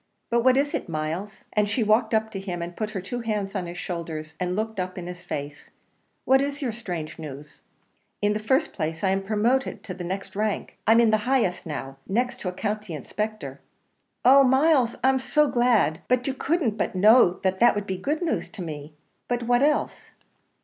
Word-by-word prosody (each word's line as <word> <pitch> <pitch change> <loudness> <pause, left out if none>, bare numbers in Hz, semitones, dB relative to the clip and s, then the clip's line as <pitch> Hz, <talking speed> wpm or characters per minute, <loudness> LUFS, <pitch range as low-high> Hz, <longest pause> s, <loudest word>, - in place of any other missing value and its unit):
"But 235 0 +2
what 260 +1 +5
is 285 +1 +1
it, - - -3
Myles?" 165 +6 -4
and 210 -1 +2
she 225 +3 +1
walked 220 +1 +3
up 220 0 0
to 195 - -5
him, 180 -3 -4
and 175 +1 -7
put 215 -1 -3
her 205 -3 -4
two 240 +6 -5
hands 210 -4 -2
on 185 -4 -3
his 175 +1 -7
shoulders, 160 -3 -5
and 180 0 -1
looked 220 0 -3
up 185 0 -3
in 180 - -5
his 180 0 -7
face 145 -2 -6 0.6
"what 265 +1 +5
is 285 0 -2
your 265 -5 -1
strange 175 -10 -6
news?" 145 -1 -9 0.6
"In 205 0 +2
the 210 - -2
first 265 +8 +1
place, 160 +1 -3
I 190 - +3
am 195 0 +1
promoted 220 +6 0
to 185 - -6
the 180 - -7
next 190 +3 -5
rank. 210 0 -2
I'm 225 +1 +6
in 230 -2 +5
the 215 +3 +1
highest 225 -11 +1
now, 135 -3 -5
next 245 +5 -1
to 185 - -3
a - - -3
County 205 -1 -3
Inspector." 215 - -5 0.6
"Oh! 275 +2 +8
Myles, 265 -1 +4
I'm 265 0 +4
so 300 +3 +2
glad! 240 - +2
but 250 0 +2
you 270 - 0
couldn't 270 -5 0
but - - -1
know 210 -1 +6
that 190 +6 +4
would 205 -1 -2
be 190 -2 -3
good 295 - -2
news 335 - -1
to 185 - -6
me; 150 -2 -7 0.3
but 245 0 -1
what 245 +1 +2
else?" 295 +1 0
210 Hz, 205 wpm, -25 LUFS, 180-245 Hz, 0.6 s, Oh